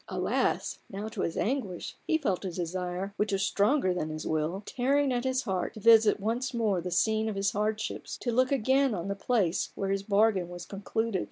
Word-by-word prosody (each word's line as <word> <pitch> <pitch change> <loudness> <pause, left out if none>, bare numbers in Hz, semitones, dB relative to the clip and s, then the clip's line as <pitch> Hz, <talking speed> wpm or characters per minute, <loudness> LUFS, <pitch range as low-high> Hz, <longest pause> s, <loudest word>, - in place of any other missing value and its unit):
Alas! - - -1
now 205 +2 -5
to 215 -3 -5
his 165 - -2
anguish 215 -7 -2
he 320 - +3
felt 205 - -1
a 190 - -2
desire, 180 +2 -3
which 210 0 0
was 195 0 +1
stronger 205 -2 +2
than 155 -3 -2
his 155 0 -5
will, 160 +5 -1
tearing 275 +1 +1
at 245 +1 -1
his 260 0 0
heart 190 0 -2
to - - -7
visit 220 -1 +6
once 240 +5 -2
more 210 -6 +1
the 180 - -4
scene 220 +4 +1
of 215 - -4
his 195 0 +1
hardships, 215 +1 -2
to 240 - -2
look 255 +3 +2
again 265 -1 +2
on 175 +1 -4
the 200 - -1
place 200 -5 0
where 195 -1 -2
his 195 0 0
bargain 200 -3 +2
was 175 0 -8
concluded. 205 +1 -2
205 Hz, 205 wpm, -29 LUFS, 185-235 Hz, -, visit